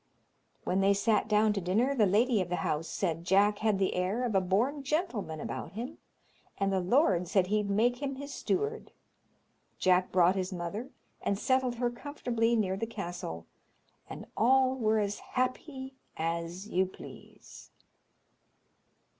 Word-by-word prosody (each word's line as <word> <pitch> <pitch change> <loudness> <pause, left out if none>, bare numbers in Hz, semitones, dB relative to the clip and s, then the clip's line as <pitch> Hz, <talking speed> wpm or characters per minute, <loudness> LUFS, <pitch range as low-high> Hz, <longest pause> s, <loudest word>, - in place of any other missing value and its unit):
When 185 - 0
they 200 +1 +4
sat 210 +1 +2
down 210 0 +3
to 200 - -2
dinner, 215 +10 +1
the 220 -7 +3
lady 220 +3 +3
of 180 - -3
the 180 - 0
house 155 +2 -1
said 165 -3 -2
Jack 200 +3 +3
had 215 -2 +2
the 190 -1 +1
air 185 +7 -1
of 240 -3 -1
a 195 - +4
born 230 +11 +1
gentleman 270 - -2
about - - -5
him, 245 +9 -6 0.6
and 195 0 0
the 190 - +2
lord 185 - +2
said 190 0 +3
he'd 210 +1 0
make 240 +6 +2
him 275 -1 -2
his 280 +1 -7
steward. 430 +4 -2 0.9
Jack 185 0 +3
brought 180 0 +5
his 190 0 -2
mother, 190 +8 -4 0.3
and 200 - 0
settled 260 +2 +1
her 240 0 0
comfortably 240 -3 -1
near 190 -4 0
the 225 - -3
castle, 175 - -6 0.6
and - - -8
all 260 +3 +4
were 220 -3 +1
as 205 -1 -1
happy 265 +1 -3 0.2
as 170 +4 -3
you 190 -2 +1
please. 190 - -13
210 Hz, 155 wpm, -30 LUFS, 185-250 Hz, 0.9 s, brought